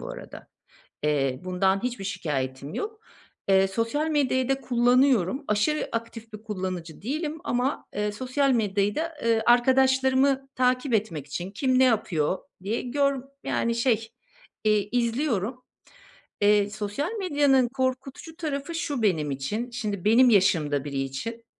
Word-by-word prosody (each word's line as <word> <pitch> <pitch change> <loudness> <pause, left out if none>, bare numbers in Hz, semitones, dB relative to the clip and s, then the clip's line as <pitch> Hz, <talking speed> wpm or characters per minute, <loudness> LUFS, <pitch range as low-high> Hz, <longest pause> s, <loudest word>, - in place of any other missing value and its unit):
bu - - -7
arada. - - -10 0.5
Eee, 135 -3 0
bundan 190 +1 +1
hiçbir 245 -5 -3
şikâyetim 140 -7 -3
yok. 435 +1 -5 0.5
Eee, 195 0 +4
sosyal 230 +10 -1
medyayı 260 -4 +1
da 270 0 +1
kullanıyorum. 250 - +2
Aşırı 215 +9 +1
aktif 230 0 -5
bir 215 0 -9
kullanıcı 185 -6 -5
değilim 305 - -3
ama, 250 +3 -1
eee, 210 0 -1
sosyal 260 +5 0
medyayı 205 -4 +1
da, 330 +1 -3
ııı, 230 -1 +3
arkadaşlarımı 265 +2 +3
takip 255 0 +1
etmek 175 -10 -1
için, 175 +6 -5
kim 255 +5 +1
ne 260 - +6
yapıyor 190 - +1 0.2
diye 210 +4 -2
gör 275 +1 0 0.2
yani, 235 0 0
şey, 230 -2 +1 0.6
eee, 210 -1 +2
izliyorum. 240 -1 -1 0.8
Eee, 205 0 +4
sosyal 210 - -3
medyanın 285 -8 +3
korkutucu 265 +5 -3
tarafı 310 0 -4
şu 290 -7 -2
benim 160 -8 +1
için. 205 - -3
Şimdi 210 -6 -4
benim 235 +4 +6
yaşımda 155 -8 +3
biri 140 -2 -3
için. 225 - -5
230 Hz, 135 wpm, -26 LUFS, 195-265 Hz, 0.8 s, ne